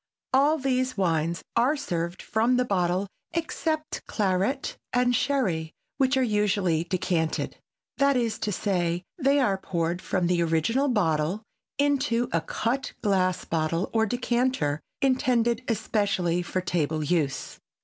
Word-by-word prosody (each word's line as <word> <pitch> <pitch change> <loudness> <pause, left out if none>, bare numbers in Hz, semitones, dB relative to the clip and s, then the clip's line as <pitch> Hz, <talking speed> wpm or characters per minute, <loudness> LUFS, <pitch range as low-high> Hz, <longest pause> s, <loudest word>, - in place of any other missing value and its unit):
All 285 +4 +4
these 255 -3 0
wines 170 -2 0
are 270 +6 +3
served 175 -8 -3
from 230 +3 +2
the 250 - +2
bottle 185 -2 +1 0.3
except 315 -1 -2
claret 205 +6 0 0.2
and 245 0 +3
sherry, 190 - 0 0.2
which 265 0 +2
are 260 - +3
usually 205 -7 +1
decanted, 170 -2 -1 0.4
that 280 -1 +4
is 230 -3 -1
to 210 - -1
say, 175 -3 0 0.2
they 275 0 +3
are 200 -8 +2
poured 170 -1 -2
from 180 - 0
the 175 0 +2
original 170 - +1
bottle 180 - +1 0.3
into 265 -4 +1
a 165 - +1
cut 230 +10 -2
glass 185 -3 +1
bottle 165 +2 -1
or 225 -1 +3
decanter 245 - 0 0.2
intended 250 -3 +2
especially 200 -6 0
for 185 +1 -2
table 160 -3 -1
use. 150 -3 -1
205 Hz, 130 wpm, -26 LUFS, 170-255 Hz, 0.4 s, All